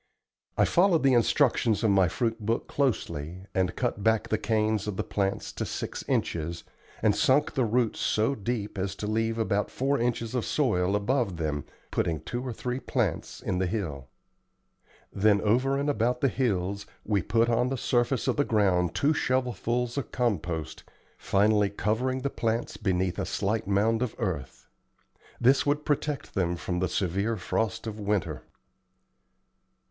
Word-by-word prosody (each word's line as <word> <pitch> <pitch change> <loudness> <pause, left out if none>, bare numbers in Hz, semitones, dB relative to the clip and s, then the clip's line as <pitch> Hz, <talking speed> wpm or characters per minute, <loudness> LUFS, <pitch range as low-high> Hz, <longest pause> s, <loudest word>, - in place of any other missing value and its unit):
I - - +5
followed 175 -3 +3
the 135 -1 +5
instructions 120 -2 +3
of 110 - +4
my 95 -2 +4
fruit 115 +4 -1
book 115 +3 -1
closely, 95 - -2
and 95 -1 0
cut 120 -5 -1
back 110 0 +2
the 110 - +2
canes 110 -1 0
of 100 -3 -3
the - - 0
plants 100 -1 -2
to - - -3
six - - -4
inches, 85 +1 -1 0.4
and 105 -2 +4
sunk 145 +3 +3
the 130 -4 +1
roots 115 0 +1
so 110 +6 +1
deep 105 -3 -3
as 95 +1 -2
to 105 - -5
leave 115 +1 0
about 105 -2 0
four 135 +2 0
inches 115 -1 -1
of 125 -3 0
soil 100 -9 +1
above 105 -3 0
them, 75 -3 -2 0.3
putting 80 -2 0
two 120 +10 -4
or 130 - -3
three 125 +3 -3
plants 110 - -2
in 90 - -1
the 95 - +1
hill. 80 - -3 1.1
Then 100 0 +4
over 130 +6 +2
and 140 +1 -1
about 125 -2 +1
the 135 - +4
hills 100 -6 -1 0.2
we 100 -2 +1
put 115 +6 +2
on 120 +1 +2
the 135 - -2
surface 120 +1 +1
of - - +1
the 145 - +4
ground 95 - +2
two 150 +2 +3
shovelfuls 125 -2 0
of 140 - -6
compost, 90 - -2 0.3
finally 105 0 +2
covering 120 +6 -1
the 140 - -1
plants 115 0 -1
beneath 95 -3 -1
a - - -1
slight 105 +1 -1
mound 110 +3 +2
of 125 -3 -2
earth. 70 - -4 0.7
This 130 +3 +4
would 145 +1 +1
protect 145 -4 -1
them 90 -3 0
from 90 +1 -3
the 95 - 0
severe 100 +5 0
frost 110 +4 -2
of 110 -1 -5
winter. 100 -8 -1
110 Hz, 165 wpm, -28 LUFS, 95-125 Hz, 1.1 s, I